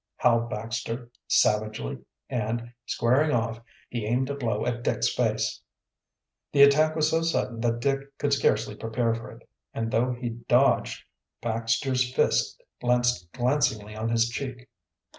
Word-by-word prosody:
howled 115 -1 +3
Baxter 115 +2 -4 0.2
savagely, 110 - +1 0.3
and, 120 +1 -3
squaring 130 +6 +2
off, 115 -2 -1 0.3
he 120 -2 -4
aimed 130 +4 0
a - - -3
blow 115 -6 -1
at 120 -1 -2
Dick's - - +1
face. - - 0 0.9
The 140 -1 +7
attack 155 +3 +5
was 155 -1 +2
so 165 - +2
sudden 130 -8 -1
that 120 0 0
Dick 140 +1 -1
could 145 -1 0
scarcely 110 -6 +2
prepare 115 +2 -1
for 115 0 -6
it, - - -15 0.3
and 115 0 -2
though 125 +3 +2
he 120 0 -4
dodged, 120 +3 +2 0.4
Baxter's 120 +3 0
fist - - +2 0.2
landed 125 0 +3 0.2
glancingly 125 -4 0
on 110 +1 -2
his 115 0 +3
cheek. 125 +1 -6
120 Hz, 140 wpm, -26 LUFS, 115-130 Hz, 0.9 s, The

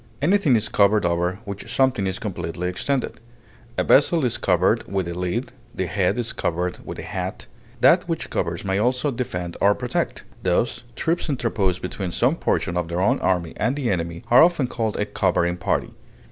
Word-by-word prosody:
Anything 160 -3 +3
is 110 -1 +1
covered 105 -1 +3
over 85 +2 0
which 100 -1 -7
something 130 -7 +2
is 95 0 -2
completely 90 -4 -4
extended; 130 +9 -2 0.6
a - - +2
vessel 150 +1 +4
is 120 - -1
covered - - +1
with 95 -3 -1
a 85 - -3
lid; 90 +8 -2 0.2
the 95 - -1
head 95 +3 0
is 120 -1 -1
covered 90 +2 -2
with - - -7
a - - -6
hat. 90 +2 -4 0.4
That - - +5
which - - -3
covers - - -2
may 95 0 0
also 125 +5 +1
defend 90 -9 -4
or 100 +1 +5
protect; - - -2 0.2
thus, 90 +6 0
troops 165 +3 -1
interposed 105 -9 0
between 90 0 -3
some 125 - +2
portion 90 - -1
of 90 -2 -1
their 85 +1 -2
own 95 - +2
army 90 -3 0
and 125 +5 0
the 135 -6 -1
enemy 85 -2 -3
are 120 - +8
often 170 -4 +4
called 115 -3 -2
a 105 - 0
covering 90 -4 +1
party. 90 - -1
100 Hz, 185 wpm, -23 LUFS, 90-125 Hz, 0.6 s, are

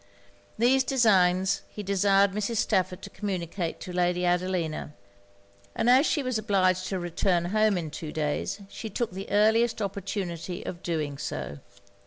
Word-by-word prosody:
These 255 +4 +4
designs 190 -8 +3
he 210 - -7
desired 200 0 +3
Mrs. 210 +3 -2
Stafford 185 -4 0
to - - -8
communicate 180 -3 -3
to 180 - -7
Lady 180 0 +1
Adelina; 175 -4 -1 0.8
and 235 +2 +3
as 265 +5 +6
she 290 - +1
was 255 -3 -1
obliged 185 -3 +1
to 190 - -2
return 175 0 0
home 215 -2 +3
in 160 -3 -4
two 155 0 -6
days, 155 +6 -2
she 220 +2 -7
took 230 +3 -2
the 190 +2 -7
earliest 220 +3 +3
opportunity 190 -3 -4
of 170 - -6
doing 150 -5 -3
so. 150 -1 -5
190 Hz, 150 wpm, -27 LUFS, 175-215 Hz, 0.8 s, as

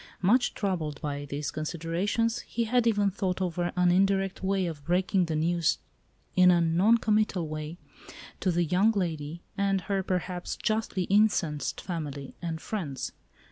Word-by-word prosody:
Much 245 +7 +3
troubled 165 -7 -2
by 145 -1 -4
these 145 0 -4
considerations 175 +9 -1
he 235 - -3
had 240 +1 +2
even 205 -3 +3
thought 185 -1 -2
over 175 -1 -1
an 180 -1 +4
indirect 195 +1 +2
way 190 -1 +1
of 160 -4 -5
breaking 180 +3 +2
the 160 -2 -2
news, 165 +1 +2 0.6
in 180 0 +7
a 175 -1 +5
non 175 +8 +4
committal 210 -6 +1
way, 155 +2 -5 0.6
to 190 - 0
the 175 0 +2
young 180 +7 +3
lady, 165 -4 -3 0.2
and 195 -1 +2
her 195 +2 -1
(perhaps) 180 -1 -3
justly 215 -4 -1
incensed 185 -8 +1
family 145 -6 -5
and 165 -2 -3
friends. 150 - -4
180 Hz, 150 wpm, -28 LUFS, 160-200 Hz, 0.6 s, in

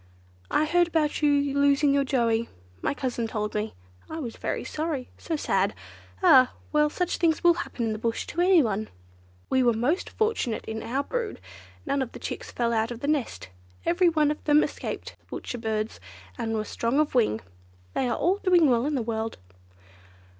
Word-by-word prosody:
I 305 - +2
heard 345 +2 +3
about 315 -3 0
you 285 -1 +3
losing 280 0 +4
your 280 0 +3
Joey—my 225 - -1
cousin 245 -5 -2
told 210 -1 -3
me. 215 +1 -3 0.3
I 320 - -5
was 245 -8 -5
very - - -3
sorry; 305 -5 -3
so 330 - -3
sad. 195 -9 +1 0.5
Ah! 255 -1 +7 0.2
well, 300 0 +3
such 360 +3 -1
things 330 -1 +1
will 345 0 +7
happen 265 -8 -4
in 225 - 0
the 215 - -5
bush 230 0 -1
to 345 - -2
anyone. 250 - +3 0.6
We 260 - +4
were 240 -2 +4
most 270 - 0
fortunate 435 - -1
in 220 0 -4
our 265 +4 -1
brood; 470 - -3 0.5
none 275 0 0
of 255 - -4
the - - -8
chicks - - -5
fell 235 -1 0
out 225 0 +1
of 240 -1 -7
the 280 - -2
nest, 290 - -1 0.4
every 345 +1 +4
one 305 -2 +2
of 300 - -6
them 300 0 +5
escaped - - -5
the - - -34
Butcher 245 - -6
Birds 220 -1 -2 0.4
and 225 -2 -2
were 215 - 0
strong 235 +6 0
of 305 -1 +1
wing. 220 - +2 0.5
They 255 - 0
are 235 - 0
all 365 +5 +2
doing 355 -8 +4
well 240 +3 +2
in 300 - 0
the 250 - 0
world." 225 0 -3
270 Hz, 190 wpm, -26 LUFS, 225-310 Hz, 0.6 s, Ah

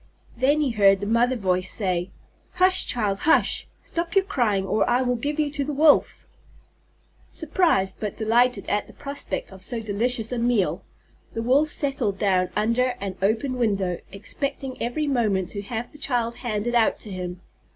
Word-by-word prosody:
Then 280 +5 +2
he 280 -4 +1
heard 200 -3 +4
the 200 - -4
Mother's 240 +4 +2
voice 185 -1 +1
say: 185 -3 -1 0.4
"Hush, 370 +1 +3
child, 205 -5 -1
hush! 320 - +2 0.2
Stop 335 +1 -3
your 390 -1 +4
crying, 225 - 0
or 200 +3 +1
I 245 +2 +3
will 250 0 0
give 290 +6 -3
you 295 -1 +1
to 285 -1 -2
the 290 +1 -4
Wolf!" 300 +1 +3 1.0
Surprised 310 - +1
but 210 -2 -4
delighted 240 +3 +2
at 205 - -1
the - - -14
prospect 280 -6 -5
of 190 0 -12
so 230 +5 -2
delicious 225 +2 0
a 245 - -2
meal, 235 -5 +1 0.5
the 225 - -3
Wolf 275 +6 +3
settled 270 -9 -1
down 185 -3 +1
under 235 +4 +1
an 195 -2 -4
open 225 +6 0
window, 195 -6 0
expecting 260 +6 -5
every 245 +6 -1
moment 215 -10 0
to 200 - -4
have 225 +3 -5
the 295 - -15
child 240 -4 0
handed 235 -1 -2
out 235 -2 +3
to 210 - -7
him. 180 -1 -5
235 Hz, 170 wpm, -24 LUFS, 200-275 Hz, 1.0 s, heard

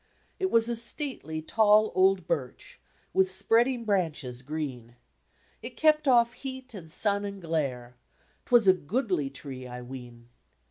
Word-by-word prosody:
It 380 -1 0
was 230 -5 +3
a 240 - -1
stately, 230 - -3
tall 215 +3 +4
old 190 -1 +3
birch, 130 -3 -4 0.3
With 190 -1 +3
spreading 230 +6 +2
branches 155 - -1
green; 130 -5 -6 0.7
It - - -9
kept 305 -1 +3
off 240 -2 +4
heat 260 0 -8
and 165 -6 -10
sun 200 +3 +1
and 200 -1 -6
glare 140 -8 -3 0.3
— - - -37
'Twas 240 -4 +4
a 190 - +8
goodly 185 - -1
tree, 135 -2 -8
I 125 0 -8
ween. 120 -2 -11
190 Hz, 145 wpm, -28 LUFS, -, 0.7 s, a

